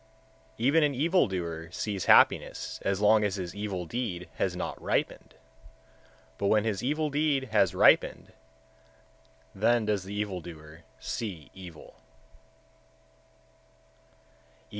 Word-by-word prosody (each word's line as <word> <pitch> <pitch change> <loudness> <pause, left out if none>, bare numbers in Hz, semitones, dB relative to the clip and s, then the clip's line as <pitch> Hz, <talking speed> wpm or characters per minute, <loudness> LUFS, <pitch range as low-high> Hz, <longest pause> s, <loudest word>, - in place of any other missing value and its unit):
119. 115 - -3
Even 155 +4 +4
an 145 -2 +1
evil 170 +7 +2
doer 85 -3 -5
sees 100 +2 -4
happiness - - +3
as 100 0 -1
long 105 +1 +5
as 100 -2 0
his 90 -3 -5
evil 100 -3 -4
deed 95 -5 -4
has - - -1
not - - -5
ripened; - - -2 1.0
but 100 - 0
when 105 0 +3
his 110 -3 -2
evil 150 +3 -1
deed 140 -3 0
has 100 -5 +2
ripened, - - +3 1.2
then 115 +3 +2
does 105 -2 0
the 100 +2 -7
evil 100 -3 -3
doer 80 -1 -12 0.2
see 95 - -6
evil. 90 -4 -12
105 Hz, 120 wpm, -28 LUFS, 90-120 Hz, 1.2 s, long